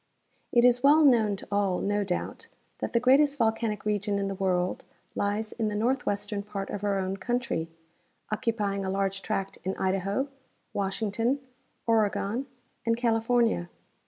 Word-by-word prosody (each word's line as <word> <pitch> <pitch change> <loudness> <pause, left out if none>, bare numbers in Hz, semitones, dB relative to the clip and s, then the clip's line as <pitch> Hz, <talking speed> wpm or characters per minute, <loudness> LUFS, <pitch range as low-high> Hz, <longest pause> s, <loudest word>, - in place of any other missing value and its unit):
It 240 0 +5
is 245 0 +5
well 295 +3 +6
known 225 -6 +4
to 195 - -10
all, 200 -3 +1
no 205 0 0
doubt, 180 -3 -4 0.3
that - - -3
the 235 - +4
greatest 280 +4 +4
volcanic 220 -3 0
region 205 -1 0
in 200 0 -1
the - - -2
world 185 -2 0 0.3
lies 205 +2 -1
in 225 -2 -2
the 210 - -2
northwestern 210 -3 0
part 200 -1 -5
of 205 - -5
our 200 -1 +1
own 190 0 -2
country, 240 -8 -2 0.6
occupying 210 -3 -1
a 190 - -2
large 195 0 -1
tract 195 0 -3
in 190 +1 -2
Idaho, 195 +7 0 0.5
Washington, 220 +6 0 0.5
Oregon 225 +2 +1 0.4
and 230 0 +1
California. 230 -5 +2
210 Hz, 150 wpm, -28 LUFS, 195-235 Hz, 0.6 s, well